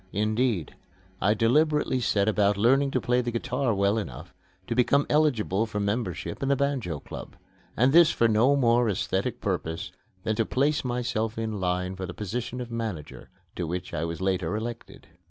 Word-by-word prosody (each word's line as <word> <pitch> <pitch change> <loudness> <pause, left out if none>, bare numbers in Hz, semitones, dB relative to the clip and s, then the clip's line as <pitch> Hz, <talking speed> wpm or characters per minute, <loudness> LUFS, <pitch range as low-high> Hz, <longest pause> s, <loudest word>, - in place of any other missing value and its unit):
Indeed, 110 - 0 0.5
I 105 +3 +3
deliberately 145 +4 +2
set 100 -4 +1
about 105 -1 +2
learning 135 +6 +3
to 130 - 0
play 125 +1 +1
the 120 - -3
guitar 125 +2 -1
well 100 +1 +2
enough 80 - -8 0.3
to 115 - -2
become 135 +4 +3
eligible 115 -9 +2
for 105 -1 -3
membership 100 -5 -2
in 135 - 0
the 140 - +4
Banjo 130 - -1
Club - - -9 0.4
and 130 +4 +4
this 170 -1 +8
for 115 - +2
no 115 +6 +4
more 120 -3 +3
aesthetic 100 +4 -1
purpose 85 -4 -3 0.3
than 110 - 0
to 115 - +3
place 145 +6 +1
myself 120 -3 -2
in 110 -2 -3
line 90 0 -1
for 95 -1 -5
the 90 - -8
position 120 +4 -4
of 120 -1 -6
manager, 110 -10 -5 0.3
to 85 - -3
which 90 +2 -4
I 75 - -2
was 85 0 -4
later 95 -1 0
elected. 115 +2 -6
110 Hz, 175 wpm, -27 LUFS, 95-125 Hz, 0.5 s, this